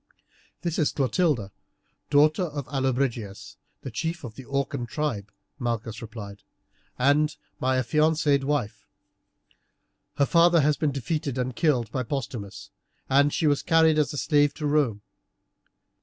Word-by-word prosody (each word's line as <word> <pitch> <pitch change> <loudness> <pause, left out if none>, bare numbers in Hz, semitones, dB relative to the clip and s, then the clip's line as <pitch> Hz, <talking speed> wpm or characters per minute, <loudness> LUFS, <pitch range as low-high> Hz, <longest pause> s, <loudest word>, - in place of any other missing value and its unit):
"This 170 -2 -1
is 155 - +2
Clotilde, 135 - 0 0.6
daughter 155 +4 +4
of 145 -4 -5
Allobrigius, 130 -7 -2 0.3
the 135 - -6
chief 165 +9 -3
of 120 -4 -7
the 130 +2 -11
Orcan 140 -2 -2
tribe," 115 -7 -3 0.3
Malchus 115 -3 -3
replied, 105 -3 -9 0.6
"and 145 +4 +3 0.2
my 130 0 +1
affianced 150 +2 +2
wife. 140 -7 -2 1.3
Her 140 - +4
father 170 +1 +5
has 150 +1 +3
been 150 0 0
defeated 140 +1 -3
and 125 -1 -2
killed 125 -9 +1
by 130 - -1
Postumius, 120 -6 -5 0.4
and 140 +2 +5
she 160 - -1
was 145 -2 +3
carried 160 -1 +4
as 150 - +1
a 145 - -5
slave 145 +2 +2
to 150 - -4
Rome. 140 -9 +1
140 Hz, 135 wpm, -26 LUFS, 120-150 Hz, 1.3 s, father